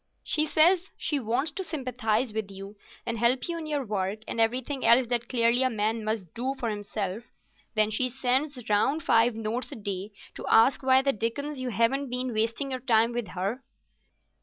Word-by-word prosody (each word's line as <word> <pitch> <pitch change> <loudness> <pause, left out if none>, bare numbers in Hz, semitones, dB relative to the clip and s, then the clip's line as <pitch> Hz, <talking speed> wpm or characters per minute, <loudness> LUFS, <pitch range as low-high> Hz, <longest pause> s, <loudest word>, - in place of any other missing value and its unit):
"She 310 0 +2
says 345 +5 +4
she 295 - -1
wants 245 +6 0
to 385 - -5
sympathise 255 - -2
with 215 -2 -3
you 195 +1 -10 0.3
and 230 -1 -3
help 245 +2 +2
you 340 -1 -3
in 315 - -6
your 290 -3 -2
work, 205 0 -2
and 230 - -1
everything 255 +4 -1
else 245 +2 +6
that 235 0 -2
clearly 235 0 +3
a 260 - +3
man 220 0 -1
must 215 -6 -3
do 260 +3 -2
for 240 -4 -3
himself. 205 +1 -4 0.5
Then 215 0 +3
she 255 +4 +1
sends 260 0 -1
round 265 +9 +1
five 230 +1 +3
notes 225 +3 -3
a - - -6
day 200 -1 -5 0.2
to - - -8
ask 225 +6 +5
why 265 0 +4
the 275 0 +2
dickens 265 +7 -3
you 255 -1 -3
haven't 245 +5 +1
been 250 0 -2
wasting 230 +5 0
your 255 - -2
time 230 -2 +3
with 240 -2 -3
her." 205 +9 -2
235 Hz, 190 wpm, -27 LUFS, 220-265 Hz, 0.5 s, else